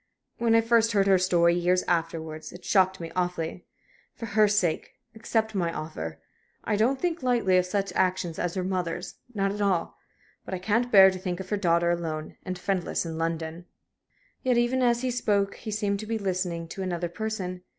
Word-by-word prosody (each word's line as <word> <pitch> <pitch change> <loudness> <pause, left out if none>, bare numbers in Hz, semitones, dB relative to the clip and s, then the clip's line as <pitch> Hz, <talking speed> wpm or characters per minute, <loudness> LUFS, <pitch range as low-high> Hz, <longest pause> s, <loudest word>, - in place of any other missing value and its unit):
When 230 -1 +3
I 225 - +6
first 230 0 +3
heard 200 -2 +3
her 195 -2 +5
story, 170 -2 +3
years 180 +1 +2
afterwards, 165 -2 -2
it 175 - -12
shocked 190 -1 +3
me 165 -1 -6
awfully. 180 -1 -2 0.5
For 230 - -6
her 215 -1 +4
sake, 195 -6 0 0.2
accept 220 0 -1
my 175 -4 0
offer. 80 - -6 0.4
I - - 0
don't 245 +6 +2
think 345 -2 -1
lightly 240 -7 +2
of 180 - -1
such 195 +1 -1
actions 180 -3 0
as 175 0 -2
your 185 -1 -1
mother's 180 -2 -3 0.2
not 195 -1 +1
at 205 +1 -4
all. 190 -4 0 0.4
But 190 - -4
I - - -2
can't 225 +6 0
bear 190 -2 +9
to 185 - -6
think 180 -1 -3
of 190 -1 -7
her 210 - +2
daughter 170 -2 +2
alone 160 -3 -3
and 185 -1 -4
friendless 180 -2 -1
in 165 -1 -5
London." 165 +1 -3 0.8
Yet 250 -2 +2
even 240 +2 +2
as 240 -1 +3
he 255 - 0
spoke 205 -5 +1
he 225 - -7
seemed 205 -1 -1
to 215 - -6
be 225 0 -1
listening 180 -4 -2
to 195 - -6
another 175 -2 -2
person. 185 -1 -4
185 Hz, 195 wpm, -27 LUFS, 175-215 Hz, 0.8 s, bear